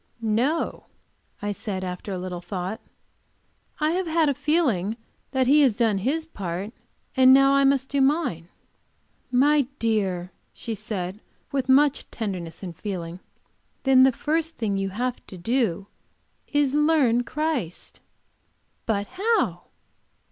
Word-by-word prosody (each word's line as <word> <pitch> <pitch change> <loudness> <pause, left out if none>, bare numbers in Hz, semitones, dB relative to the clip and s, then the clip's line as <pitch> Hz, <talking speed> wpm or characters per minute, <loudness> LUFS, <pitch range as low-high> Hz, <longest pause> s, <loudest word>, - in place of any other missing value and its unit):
"No," 245 +9 0 0.6
I 205 - -1
said, 200 -2 -4
after 180 +2 -5
a 190 - -2
little 180 -1 -5
thought. 190 +4 -5 1.0
"I 305 0 +2
have 365 +1 -1
had 320 -2 +2
a - - +2
feeling 260 - 0 0.3
that 265 -1 +1
He 290 +4 +5
has 250 -7 +3
done 225 -5 +2
His 300 +10 -1
part, 195 - -5 0.4
and 260 -1 +7
now 275 0 +5
I 275 0 +4
must 270 -1 +2
do 280 -1 +1
mine." 265 - +1 0.8
"My 280 +2 +4
dear," 195 -7 -1 0.2
she 230 - -5
said, 205 -2 -4 0.3
with 270 -2 -1
much 285 +2 +4
tenderness 185 -6 -5
and 175 -3 -6
feeling, 175 -3 -5 0.6
"then 265 -1 +6
the 265 0 +7
first 320 +5 -2
thing 210 -4 -1
you 195 0 -1
have 245 +5 -3
to 190 - -9
do 205 -2 0 0.6
is 290 -2 +2
to 295 +2 +2
learn 265 -7 +3
Christ." 295 - -3 0.9
"But 205 -3 0
how?" 440 - 0
240 Hz, 140 wpm, -25 LUFS, 195-285 Hz, 1.0 s, and